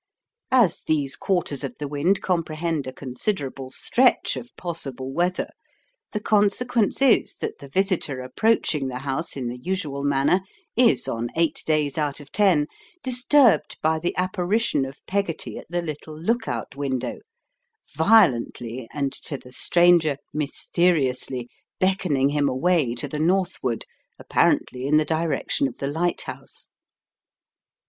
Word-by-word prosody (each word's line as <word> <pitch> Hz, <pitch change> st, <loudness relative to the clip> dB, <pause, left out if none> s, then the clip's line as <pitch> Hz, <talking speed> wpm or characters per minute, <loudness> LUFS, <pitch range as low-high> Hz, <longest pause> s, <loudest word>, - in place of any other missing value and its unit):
As 235 Hz, -10 st, +4 dB
these 145 Hz, -4 st, +1 dB
quarters 175 Hz, -7 st, -1 dB
of 245 Hz, -, -4 dB
the 145 Hz, -, -4 dB
wind 145 Hz, +7 st, +1 dB
comprehend 165 Hz, -4 st, -1 dB
a -, -, -3 dB
considerable 135 Hz, 0 st, -4 dB
stretch 250 Hz, -, +2 dB
of 240 Hz, -, -7 dB
possible 135 Hz, -7 st, -5 dB
weather, 180 Hz, +3 st, 0 dB, 0.6 s
the 210 Hz, -, -2 dB
consequence 215 Hz, +4 st, +2 dB
is 260 Hz, -4 st, +4 dB
that -, -, -5 dB
the 140 Hz, -, -10 dB
visitor 185 Hz, -4 st, 0 dB
approaching 145 Hz, -, +1 dB
the 125 Hz, -1 st, -4 dB
house 135 Hz, +4 st, -3 dB
in 125 Hz, -3 st, -3 dB
the 120 Hz, +1 st, -5 dB
usual 150 Hz, -4 st, -3 dB
manner 145 Hz, +6 st, +3 dB, 0.3 s
is 240 Hz, -1 st, +3 dB
on 115 Hz, +1 st, -2 dB
eight 165 Hz, -2 st, +1 dB
days 155 Hz, -1 st, +1 dB
out 145 Hz, -1 st, -1 dB
of 145 Hz, -1 st, -13 dB
ten 185 Hz, -8 st, +3 dB, 0.4 s
disturbed 250 Hz, -, +3 dB
by 160 Hz, 0 st, +2 dB
the 175 Hz, +2 st, -2 dB
apparition 185 Hz, -, +1 dB
of 135 Hz, +2 st, -11 dB
Peggotty 195 Hz, -4 st, -2 dB
at -, -, -13 dB
the 175 Hz, 0 st, -1 dB
little 155 Hz, -1 st, -7 dB
look 225 Hz, +7 st, 0 dB
out -, -, -4 dB
window, 135 Hz, -3 st, -2 dB, 0.8 s
violently, 130 Hz, -, +3 dB
and 140 Hz, -2 st, -2 dB
to 140 Hz, -, -5 dB
the 125 Hz, -, -15 dB
stranger, 170 Hz, 0 st, +4 dB, 0.2 s
mysteriously, 140 Hz, -4 st, 0 dB, 0.3 s
beckoning 180 Hz, -8 st, +2 dB
him 145 Hz, -1 st, +1 dB
away 140 Hz, -2 st, +1 dB
to 145 Hz, +4 st, -3 dB
the 150 Hz, +2 st, -5 dB
northward, 175 Hz, -, 0 dB, 0.3 s
apparently 130 Hz, +1 st, +1 dB
in 150 Hz, +2 st, +4 dB
the 155 Hz, -, +3 dB
direction 155 Hz, -3 st, 0 dB
of 125 Hz, -, -9 dB
the -, -, -4 dB
lighthouse. 165 Hz, +5 st, -4 dB
155 Hz, 140 wpm, -24 LUFS, 135-185 Hz, 0.8 s, As